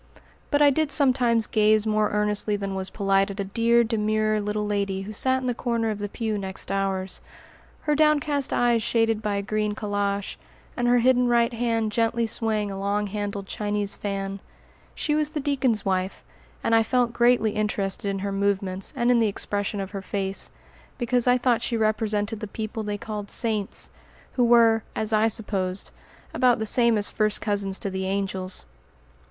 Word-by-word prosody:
But 290 0 +3
I 285 - +6
did 310 +1 0
sometimes 250 -5 +3
gaze 215 0 +3
more 215 -1 +1
earnestly 210 0 0
than 200 -1 -4
was 190 0 -3
polite 195 -1 +1
at 200 +1 -7
a - - 0
dear, 230 +4 +3
demure 215 -1 0
little 210 +1 -2
lady 200 -2 -1
who 210 +2 -7
sat 260 +4 +1
in - - -5
the 250 - 0
corner 230 -2 -1
of 210 - -5
the 205 0 -4
pew 220 -1 -3
next 190 0 -6
ours, 195 -1 -1 0.6
her 300 - 0
downcast 295 -2 +2
eyes 240 -1 +2
shaded 225 -1 +1
by 210 -2 -1
a 200 - -2
green 210 0 -1
calash, 205 -1 -2 0.4
and 245 -1 0
her 245 0 +5
hidden 250 +1 +3
right 235 0 +2
hand 230 -2 0
gently 230 +1 +1
swaying 220 -2 -1
a 195 - -5
long 200 +1 0
handled 205 -1 -4
Chinese 205 0 -2
fan. 195 -1 -4 0.6
She 300 - -1
was 300 0 +2
the 305 - -4
deacon's 265 -6 +1
wife, 190 0 -1 0.4
and 230 - +1
I 225 - +6
felt 240 +1 +1
greatly 240 -2 +3
interested 205 -1 -1
in 195 - -2
her 200 - -2
movements 195 -1 -1
and 240 -1 +2
in 240 - +4
the 225 - +3
expression 205 0 -3
of 195 -1 -5
her 200 -2 -5
face, 195 0 -3 0.5
because 245 0 +1
I 250 0 +5
thought 245 -2 +1
she 235 0 -1
represented 215 -1 0
the 215 - -5
people 220 +2 -5
they 210 -1 -3
called 210 -1 -6
"saints," 215 -4 -1 0.4
who 245 - +2
were, 230 -1 +5
as 220 0 0
I 215 +1 +4
supposed, 195 -4 -3 0.4
about 250 -2 +3
the 220 - -2
same 235 0 +4
as 205 - +1
first 215 -1 0
cousins 200 -2 -1
to 200 - -4
the 190 0 -3
angels. 190 - -1
215 Hz, 185 wpm, -25 LUFS, 200-235 Hz, 0.6 s, I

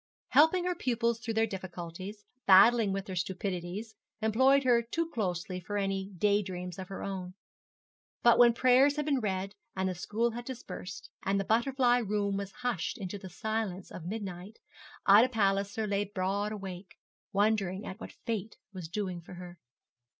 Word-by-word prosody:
Helping 320 +7 +5
her 360 - +1
pupils 235 -7 0
through 230 -1 -4
their 225 0 +4
difficulties, 185 +1 -7 0.2
battling 200 +2 +7
with 195 0 -2
their 190 - -6
stupidities, 185 +3 -3 0.3
employed 260 +6 +4
her 245 -2 +4
too 325 +8 -2
closely 180 - -2
for 205 +3 -4
any 195 -1 -1
day 205 +3 +3
dreams 180 -2 -6
of 185 - -6
her 195 - -6
own. 185 -2 -5 0.9
But 235 -1 +6
when 240 -1 +7
prayers 255 +4 +5
had 300 -1 -2
been 285 -3 +2
read, 195 -3 -2 0.2
and 190 0 0
the 185 - -1
school 215 +6 -1
had 240 +2 -6
dispersed, 235 -6 -8
and 195 +1 +1
the - - 0
butterfly 245 +2 +3
room 205 -3 -1
was 200 0 -4
hushed 245 -7 -1
into 200 -1 -5
the 190 - -9
silence 210 -1 -3
of 165 - -8
midnight, 195 0 -6 0.5
Ida 210 +6 +7
Palliser 200 -1 +1
lay 205 0 0
broad 200 +1 -1
awake, 190 -2 -7 0.3
wondering 200 -2 +1
at 190 - -7
what - - -9
Fate 220 -2 -3 0.2
was 180 -4 -6
doing 185 -2 -3
for 175 - -11
her. 175 -1 -10
205 Hz, 165 wpm, -30 LUFS, 185-230 Hz, 0.9 s, battling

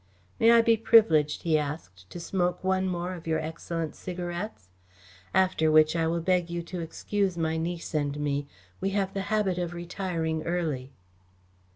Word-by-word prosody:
"May 225 - +5
I 230 0 +7
be 230 -1 +4
privileged," 210 -10 +4
he 160 -2 +3
asked, 120 - -6
"to - - -8
smoke 180 +1 -1
one 190 0 +1
more 180 0 -3
of 170 -2 -9
your 160 -1 +1
excellent 160 0 -4
cigarettes? 175 - -6 0.6
After 185 -4 +3
which, 155 +1 +5
I 165 -1 +1
will 170 +1 0
beg 180 0 +1
you 170 0 -3
to 175 +1 -6
excuse 185 +3 -2
my 160 -1 0
niece 170 +1 -4
and 145 -1 -1
me. 145 -1 -1 0.3
We 195 - 0
have 195 -1 0
the 195 - -2
habit 205 -4 +1
of 175 0 -3
retiring 170 -2 -3
early." 155 -6 -2
170 Hz, 170 wpm, -27 LUFS, 160-185 Hz, 0.6 s, I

